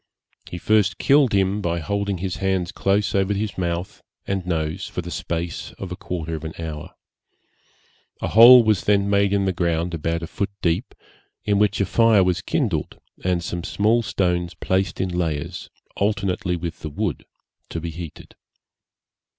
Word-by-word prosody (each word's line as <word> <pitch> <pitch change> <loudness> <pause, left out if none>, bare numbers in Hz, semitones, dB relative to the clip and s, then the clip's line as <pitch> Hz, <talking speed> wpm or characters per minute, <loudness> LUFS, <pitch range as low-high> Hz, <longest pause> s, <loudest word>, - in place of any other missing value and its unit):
He 90 - -6
first 105 0 +2
killed 140 -3 +4
him 100 +1 +1
by 85 -2 -1
holding 100 +3 -2
his 95 0 -3
hands 95 -3 -1
close 100 +1 0
over 100 +1 +1
his 105 0 -3
mouth 85 0 -3 0.2
and 95 -1 -2
nose 80 -3 -2
for - - -5
the - - -7
space 85 0 -4
of 95 -2 -8
a - - -3
quarter 85 -3 -5
of 80 -1 -5
an 80 0 -5
hour. 80 -3 -7 1.2
A - - -2
hole 120 +3 +9
was 110 -4 +1
then 100 -1 +3
made 100 0 +3
in 100 -1 +1
the 95 - 0
ground 85 0 -1
about 85 +1 -2
a - - -2
foot 100 +4 -3
deep, 90 +8 0 0.5
in 100 -1 +2
which 105 -1 +2
a 100 - +2
fire 110 0 +4
was 90 -1 0
kindled, - - -2 0.2
and 90 -2 0
some 85 0 -4
small 110 +6 +2
stones 90 -4 -1
placed 95 -1 -1
in 95 - 0
layers, 85 0 -3 0.3
alternately 100 -2 0
with 85 -1 -5
the 80 - -6
wood, 70 - -3 0.5
to 85 - -4
be 85 +1 -5
heated. 85 -1 -9
90 Hz, 170 wpm, -22 LUFS, 85-100 Hz, 1.2 s, hole